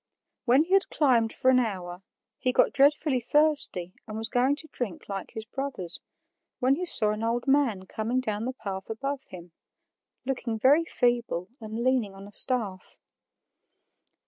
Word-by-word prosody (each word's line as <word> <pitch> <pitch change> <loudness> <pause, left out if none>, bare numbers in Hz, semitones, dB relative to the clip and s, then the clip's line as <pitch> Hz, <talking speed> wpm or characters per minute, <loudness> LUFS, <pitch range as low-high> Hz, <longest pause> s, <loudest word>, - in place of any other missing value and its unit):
When 260 +4 +5
he 360 +4 -4
had 390 0 +3
climbed 240 -7 +2
for 260 - +2
an 255 - +4
hour, 185 -6 -4 0.4
he 255 - +1
got - - +3
dreadfully 285 0 +3
thirsty 280 - +1
and 215 0 -6
was 225 0 0
going 255 +3 +2
to 315 - -8
drink 215 -9 -5
like 195 -2 -5
his 220 -1 -6
brothers, 250 -8 -5 0.6
when 255 +1 +2
he 355 +5 -1
saw 215 -9 +6
an 215 +1 -4
old 235 +3 -1
man 265 -9 +2
coming 225 +6 -2
down 215 -3 -3
the 260 - -3
path 195 -6 -7
above 275 +5 -4
him, 175 -1 -12 0.7
looking 250 -4 -3
very 285 +8 +4
feeble 240 - -1
and 220 +1 -5
leaning 245 -6 0
on 195 0 -11
a - - -14
staff. 210 -5 +1
240 Hz, 165 wpm, -27 LUFS, 210-270 Hz, 0.7 s, saw